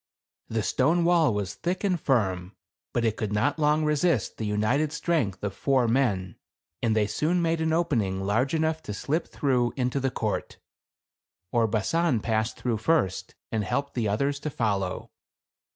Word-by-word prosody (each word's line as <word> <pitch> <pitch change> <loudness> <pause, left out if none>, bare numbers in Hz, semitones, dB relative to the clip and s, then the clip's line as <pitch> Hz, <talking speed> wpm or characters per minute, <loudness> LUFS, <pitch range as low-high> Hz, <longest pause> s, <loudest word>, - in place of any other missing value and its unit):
The 110 -1 -1
stone 155 - +2
wail 170 -5 +4
was 100 -2 -2
thick 180 +3 -3
and 180 -5 +1
firm, 95 -8 0 0.4
but 120 -1 0
it 110 -1 0
could 110 -3 -2
not 140 +9 +1
long 150 +1 +3
resist 150 - +1
the 110 - -3
united 110 +9 +1
strength 150 - -1
of 100 -2 -2
four 130 +3 +2
men, 110 -8 0 0.4
and 115 -2 +1
they 110 -1 +3
soon 155 - 0
made 165 -1 +1
an 160 0 +1
opening 120 - +1
large 115 +10 +1
enough 160 0 0
to 105 - -3
slip 155 +9 -1
through 125 -4 0
into 125 +1 0
the 135 0 0
court. - - -3 1.0
Orbasan 115 +6 +2
passed 110 0 -1
through 120 -3 -1
first, 110 - 0 0.2
and 110 -1 0
helped 140 +9 -2
the 115 -3 0
others 140 +8 0
to 150 - -3
follow. 100 -8 -2
125 Hz, 165 wpm, -26 LUFS, 105-155 Hz, 1.0 s, wail